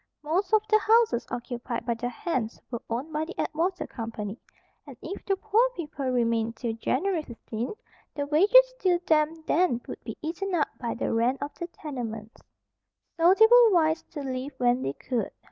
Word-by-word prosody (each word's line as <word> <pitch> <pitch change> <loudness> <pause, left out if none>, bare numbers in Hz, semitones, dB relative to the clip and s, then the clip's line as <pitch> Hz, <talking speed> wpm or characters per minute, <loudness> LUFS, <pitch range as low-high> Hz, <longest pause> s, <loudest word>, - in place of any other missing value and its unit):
Most 360 +6 0
of 435 -1 +4
the 430 0 +5
houses 445 - +3
occupied 240 -1 -4
by 240 - +1
the 245 +2 -3
hands 245 -4 -3
were 235 - -4
owned 260 +7 -3
by 305 +1 -1
the 350 - -10
Atwater 345 +4 -1
Company, 225 -1 -6 0.5
and - - -11
if 395 - -7
the 390 - +2
poor 440 +5 +2
people 295 -4 -5
remained 230 -2 +1
till 230 0 -3
January 320 - 0
15th, 235 - -6 0.4
the 285 - -2
wages 420 +12 +5
due 365 -6 +3
them 315 +1 +2
then 320 -8 +2
would - - -8
be - - -7
eaten 355 +4 -2
up 305 - +1
by 235 -2 -3
the - - -2
rent 235 +4 +2
of 285 - -6
the 345 - -6
tenements. 235 -9 -7 0.8
So 345 +3 +6
they 445 - +7
were 475 -1 +7
wise 320 -2 +3
to 300 - -4
leave 265 +1 -4
when 245 0 +2
they 135 - -2
could. 235 - -3
295 Hz, 180 wpm, -27 LUFS, 240-360 Hz, 0.8 s, they